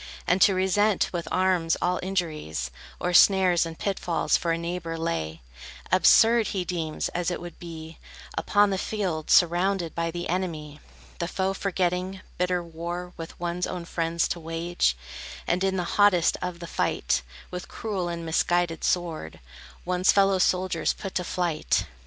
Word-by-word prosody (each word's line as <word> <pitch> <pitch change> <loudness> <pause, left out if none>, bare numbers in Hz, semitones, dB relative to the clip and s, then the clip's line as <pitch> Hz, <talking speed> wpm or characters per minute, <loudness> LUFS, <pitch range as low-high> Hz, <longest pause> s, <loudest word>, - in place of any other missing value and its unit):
And 180 +2 +2
to 195 - +6
resent 190 +2 +2
with 170 -1 -3
arms 180 -3 +2
all 180 0 0
injuries, 155 - -3 0.3
Or 180 - -1
snares 180 -2 +5
and 165 0 -8
pit 200 -2 -2
falls 170 - +1
for 170 - 0
a 165 - +1
neighbor 170 -1 -4
lay, 80 - -3 0.5
Absurd 230 0 +6
he 185 -3 -2
deems, 165 -3 -2
as 175 0 -1
it 175 - -3
would 175 0 -9
be, 160 -2 -9 0.4
upon 205 -1 +3
The 190 - -1
field, 185 -9 -2
surrounded 175 0 +3
by 165 0 -1
the 175 +1 -4
enemy, 160 -5 -3 0.4
The 170 - -1
foe 190 +1 -1
forgetting, 185 -1 -1 0.2
bitter 180 -1 +1
war 170 +2 -6
With 165 0 -9
one's 175 +1 -2
own 180 -2 -5
friends 165 -1 0
to 175 - -2
wage, 165 - 0 0.5
And 180 +2 0
in 190 0 +1
the 180 - 0
hottest 185 -2 +3
of 180 -1 -4
the - - -5
fight, 60 - 0 0.3
With 180 0 -6
cruel 200 -5 -3
and 170 -1 -4
misguided 170 +1 +1
sword, 165 - -1 0.5
One's 180 +1 +3
fellow 195 -1 +3
soldiers 180 -2 +1
put 195 -2 -7
to 180 - -1
flight. 175 -3 0
175 Hz, 160 wpm, -26 LUFS, 165-185 Hz, 0.5 s, to